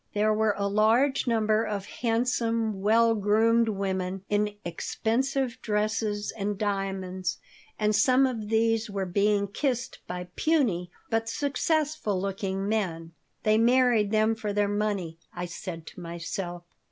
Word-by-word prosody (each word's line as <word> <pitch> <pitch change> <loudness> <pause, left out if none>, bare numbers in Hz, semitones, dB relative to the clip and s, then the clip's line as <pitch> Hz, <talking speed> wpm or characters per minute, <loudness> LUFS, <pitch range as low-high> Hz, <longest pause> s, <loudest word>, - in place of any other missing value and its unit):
There 215 +1 +3
were 215 -1 +2
a 200 0 0
large 230 +7 +3
number 220 -1 +2
of 200 -3 -3
handsome, 230 -3 0
well 225 +3 +4
groomed 225 +2 +3
women 190 -2 -2
in 205 0 +1
expensive 255 +8 -1
dresses 210 -1 -1
and 205 -1 -2
diamonds, 190 -3 -2 0.4
and 210 0 +2
some 255 +5 +5
of 225 -5 -3
these 225 0 +2
were 200 -1 -2
being 200 +2 +2
kissed 250 +4 -2
by 180 0 -5
puny, 235 - +1 0.2
but 225 0 0
successful 285 - 0
looking, 195 0 -2
men. 175 -7 -2 0.3
"They 215 0 +4
married 240 -3 +4
them 215 +1 +3
for 220 -2 -3
their 205 0 +2
money," 200 -5 -2 0.2
I 175 0 -3
said 170 -1 -7
to - - -11
myself. 175 +1 -5
210 Hz, 135 wpm, -27 LUFS, 195-225 Hz, 0.4 s, some